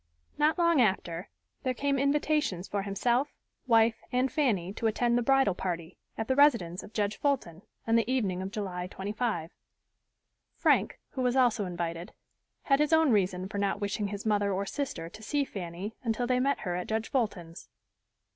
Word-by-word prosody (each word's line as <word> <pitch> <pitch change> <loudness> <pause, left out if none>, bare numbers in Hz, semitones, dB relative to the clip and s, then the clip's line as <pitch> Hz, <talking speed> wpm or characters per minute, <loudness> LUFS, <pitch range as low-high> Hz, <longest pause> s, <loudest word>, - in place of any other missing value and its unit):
Not 305 +3 +3
long 335 -5 +4
after 190 -3 0 0.3
there 255 -1 -1
came 280 +1 0
invitations 280 - +1
for 200 - -2
himself, 235 +8 0 0.3
wife 225 -1 +4
and 255 +1 +1
Fanny 205 - 0
to 225 - -1
attend 235 +2 +1
the 245 - +3
bridal 270 -4 +3
party, 175 -2 -4 0.2
at 225 - -3
the 260 - +2
residence 235 - +4
of - - -12
Judge 210 -1 -1
Fulton, 250 - -1 0.2
on 225 - +2
the 230 +2 +1
evening 195 -8 0
of 190 - -4
July 190 -4 -4
25. 200 -3 -3 1.0
Frank, - - +2
who 265 - -4
was 250 0 +1
also 240 -5 +3
invited, 170 +1 -4 0.5
had 275 -1 +3
his 300 +1 +2
own 320 -3 +5
reason 185 -3 +1
for 200 0 -4
not 200 0 0
wishing 205 0 -2
his 205 +1 -6
mother 205 -2 +2
or 195 +1 -1
sister 195 - -4
to 215 +6 -12
see 285 +6 0
Fanny 185 0 -6
until 230 +1 0
they 250 0 +2
met 275 +2 +1
her 180 -4 -2
at 180 - -3
Judge 220 0 -2
Fulton's. 185 -10 -3
215 Hz, 175 wpm, -29 LUFS, 190-255 Hz, 1.0 s, own